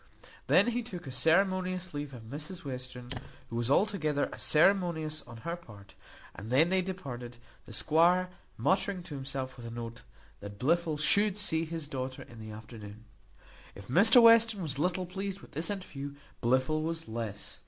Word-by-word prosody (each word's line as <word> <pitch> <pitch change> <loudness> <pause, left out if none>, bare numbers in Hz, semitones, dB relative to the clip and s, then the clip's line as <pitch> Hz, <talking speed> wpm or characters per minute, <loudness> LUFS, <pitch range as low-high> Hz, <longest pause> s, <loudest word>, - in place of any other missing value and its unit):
He - - -13 0.2
then 240 0 +3
took 180 -7 -8
a 135 - -6
ceremonious 185 +5 +2
leave 145 -1 -4
of 115 - -10
Mrs 150 +9 -7
Western, 125 -2 -6 0.4
who - - -4
was 120 +1 0
altogether 155 -4 +1
as - - -7
ceremonious 160 -2 +3
on 115 -1 -10
her 170 0 -2
part; 105 - -15 0.4
and 105 +3 -9
then 145 +7 +4
they 190 0 +2
departed, 130 -11 -6 0.3
the - - -10
squire 175 +3 +3 0.3
muttering 190 -1 0
to 155 - -9
himself 135 -1 -5
with 120 -1 -8
an 115 +1 -7
oath, 115 0 -6 0.4
that 100 0 -9
Blifil 160 - +1
should 200 +6 +4
see 165 -5 +1
his 165 -2 -5
daughter 130 -2 -5
in 120 -4 -14
the 110 0 -8
afternoon. 110 0 -10 0.7
If 100 +2 -11
Mr 220 - +8
Western 230 -3 +6
was 140 -3 -3
little 180 +3 0
pleased 195 +2 -5
with - - -15
this 160 +3 -2
interview, 145 -8 -6 0.3
Blifil 130 +6 +2
was 165 +1 -3
less. 110 -3 -5
155 Hz, 170 wpm, -30 LUFS, 125-185 Hz, 0.7 s, Mr